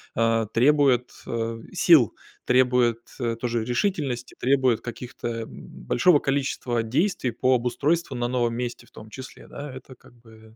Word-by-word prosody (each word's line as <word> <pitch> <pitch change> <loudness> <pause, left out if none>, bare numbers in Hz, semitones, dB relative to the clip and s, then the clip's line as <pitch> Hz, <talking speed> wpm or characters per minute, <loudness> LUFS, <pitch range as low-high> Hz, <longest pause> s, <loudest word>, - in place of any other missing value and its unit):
а, 115 0 +2
требует, 125 +1 +3 0.2
а, 115 0 -3
сил, 160 - +5 0.3
требует, 125 -2 +3 0.2
э, 115 -2 -1
тоже 120 -2 -1
решительности, 125 - -2
требует 130 -3 +2
каких-то, 120 0 -7 0.2
м, - - -11 0.2
большого 170 - +4
количества 135 -4 -1
действий 135 - 0
по 130 +3 +1
обустройству 135 +6 0
на 120 0 -1
новом 120 -2 0
месте 120 -1 -5
в - - -25
том 110 - -12
числе, 130 -1 -10
да? 145 0 -8
Это 130 0 -11
как 120 - -20
бы 110 -2 -18
125 Hz, 150 wpm, -25 LUFS, 115-135 Hz, 0.3 s, сил